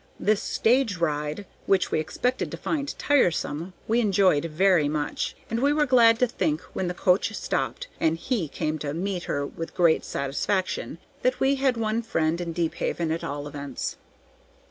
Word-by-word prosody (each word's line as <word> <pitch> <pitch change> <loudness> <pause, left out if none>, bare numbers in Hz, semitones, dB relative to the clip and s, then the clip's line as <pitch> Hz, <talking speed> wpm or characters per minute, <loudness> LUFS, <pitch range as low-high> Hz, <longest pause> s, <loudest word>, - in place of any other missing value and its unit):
This 210 0 +2
stage 230 -4 +2
ride, 150 +2 -2 0.2
which 190 -2 +2
we - - +2
expected 245 +11 -1
to - - -6
find 285 -3 -2
tiresome, 175 - +1
we 230 +2 +2
enjoyed 190 -8 +3
very 165 -1 +3
much, 150 -1 -2
and 230 - -2
we 285 +3 +3
were 300 0 +3
glad 235 -4 +6
to 250 - +3
think, 160 - -1
when 185 - -2
the 175 - -3
coach 185 +4 +2
stopped, - - -2
and 160 0 +2
"he" 180 - -1
came 155 +2 -3
to 145 0 -3
meet 180 0 -2
her 145 0 -1
with 165 +3 -7
great 170 -3 +4
satisfaction, 155 +2 -2 0.2
that 255 0 +1
we 270 +1 +3
had 265 -3 +1
one 225 0 0
friend 165 -6 0
in 170 -1 -3
Deephaven 165 0 -1
at 165 - -2
all 145 +1 -4
events. 140 -2 -5
180 Hz, 170 wpm, -26 LUFS, 155-230 Hz, 0.2 s, glad